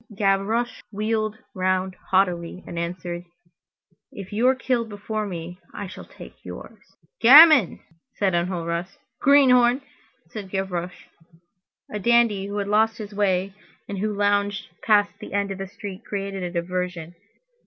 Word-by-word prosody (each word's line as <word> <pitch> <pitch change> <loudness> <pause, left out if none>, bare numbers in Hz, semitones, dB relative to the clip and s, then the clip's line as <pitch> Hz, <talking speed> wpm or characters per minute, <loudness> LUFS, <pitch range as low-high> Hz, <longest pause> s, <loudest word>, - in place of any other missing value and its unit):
Gavroche 210 +4 0
wheeled 215 +1 -1 0.2
round 185 0 -1
haughtily, 180 -2 0
and 170 - -6
answered:— 175 0 -4 0.9
"If 195 0 -9
you 230 +4 +2
are 260 - +4
killed 245 -3 -1
before 210 +1 -4
me, 175 -1 -7 0.2
I 205 - -5
shall 185 - -10
take - - -14
yours." - - -10 0.4
"Gamin!" 275 - +8 0.3
said 195 -3 0
Enjolras. 170 0 -2 0.2
"Greenhorn!" 260 -2 +5 0.5
said 200 -3 -7
Gavroche. 180 -2 -4 0.9
A 210 - -3
dandy 225 -2 +3
who 200 +1 -5
had 200 -1 -2
lost 220 +2 +2
his 210 -2 -8
way 195 -1 0 0.3
and 200 -1 -5
who 215 +2 -1
lounged 205 0 0
past 205 -2 +3
the - - -9
end 200 0 0
of 195 - -6
the 195 - -4
street 195 +1 -9
created 195 -2 -4
a 180 - -3
diversion! 175 -1 -4
200 Hz, 140 wpm, -23 LUFS, 185-215 Hz, 0.9 s, Gamin